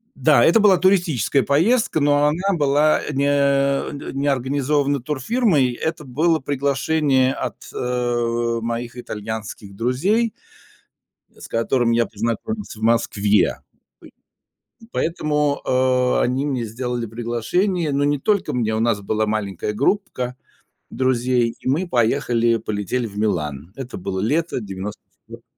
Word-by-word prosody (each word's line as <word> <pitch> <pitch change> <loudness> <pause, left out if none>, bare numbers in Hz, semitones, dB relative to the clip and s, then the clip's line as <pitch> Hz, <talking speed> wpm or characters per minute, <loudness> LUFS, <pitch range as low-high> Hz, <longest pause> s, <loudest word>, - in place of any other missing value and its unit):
Да, 125 -2 +4
это 200 +7 +5
была 200 -3 +5
туристическая 170 - +2
поездка, 180 - +2
но 145 0 +3
она 180 +5 0
была, 145 +1 +3
э, 150 - -5
не, 140 +1 +1
э, 140 -1 +2
н 145 - -7
не 140 - 0
организована 140 +1 +1
турфирмой. 150 - +1
Это 155 +5 -4
было 155 +5 +1
приглашение 140 0 +1
от, 130 -5 -4 0.2
э, 120 -1 -1
моих 120 +1 -4
итальянских 110 -3 -6
друзей. 180 - +1 1.1
С - - -11
которыми 115 0 +1
я 115 - +2
познакомился 120 - -4
в - - -12
Москве. 105 -3 +2 1.2
Пой 225 - -16
поэтому, 150 -5 0
э, 130 0 +2
они 130 +3 0
мне 130 -5 -2
сделали 120 +1 -3
приглашение, 120 - -1
но 140 - +1
не 145 0 +1
только 200 +6 0
мне, 110 -3 0
у 110 - -1
нас 115 -3 +1
была 110 +2 0
маленькая 105 -1 -2
группка 125 - -1 0.5
друзей, 125 -2 +1
и - - -8
мы 165 +7 0
поехали, 120 -2 +2
полетели 110 +3 -3
в 100 - -11
Милан. 80 -7 -2
Это 130 -1 -7
было 95 0 -4
лето 155 +6 0
94-го. 100 0 -9
130 Hz, 130 wpm, -21 LUFS, 115-150 Hz, 1.2 s, это